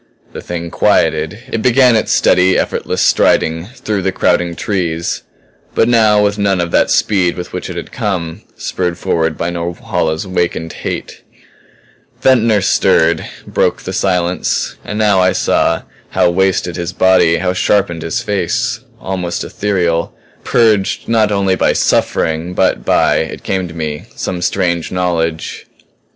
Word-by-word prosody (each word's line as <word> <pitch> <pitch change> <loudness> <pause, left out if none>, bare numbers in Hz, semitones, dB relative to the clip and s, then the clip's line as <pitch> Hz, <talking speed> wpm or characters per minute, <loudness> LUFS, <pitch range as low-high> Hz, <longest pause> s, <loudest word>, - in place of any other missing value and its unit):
The - - -7
Thing 85 -1 -5
quieted; - - +1
it 115 - -1
began 125 0 +4
its 110 - 0
steady, 90 +1 +3
effortless - - -1
striding 80 +2 +2
through 110 -4 -3
the 95 0 0
crowding 85 -2 +1
trees 85 -5 -2 0.5
but 115 - +3
now 110 -3 +4
with 105 0 0
none 100 -2 +1
of 85 -1 -2
that - - +3
speed 95 -5 +1
with 90 0 -7
which - - -5
it - - -6
had - - -6
come, 85 -5 -3
spurred 90 -2 -3
forward 80 -2 -1
by 85 +1 -2
Norhala's 85 -1 -2
awakened 85 -3 -2
hate. - - -6 1.0
Ventnor 115 -5 +3
stirred; 85 -3 +2 0.2
broke - - 0
the - - -5
silence. 90 -1 0
And 105 - -5
now 105 -3 +3
I 95 0 +3
saw - - +1 0.3
how 85 - +2
wasted 95 -1 +1
was 85 -1 -3
his - - -7
body, 95 -3 +4
how 90 0 -1
sharpened 95 -3 +1
his 80 0 -2
face; 110 +5 -1 0.2
almost 90 -2 -3
ethereal; 85 -5 -1 0.3
purged 110 -4 +1
not 110 -2 +2
only 100 -2 +1
by - - +2
suffering 80 +3 0
but - - +1
by, - - +3
it - - -4
came 95 -2 -1
to 85 - -11
me, 75 +2 -4
some 90 -1 -4
strange 85 -3 -1
knowledge. 85 -3 -2
90 Hz, 150 wpm, -15 LUFS, 85-105 Hz, 1.0 s, began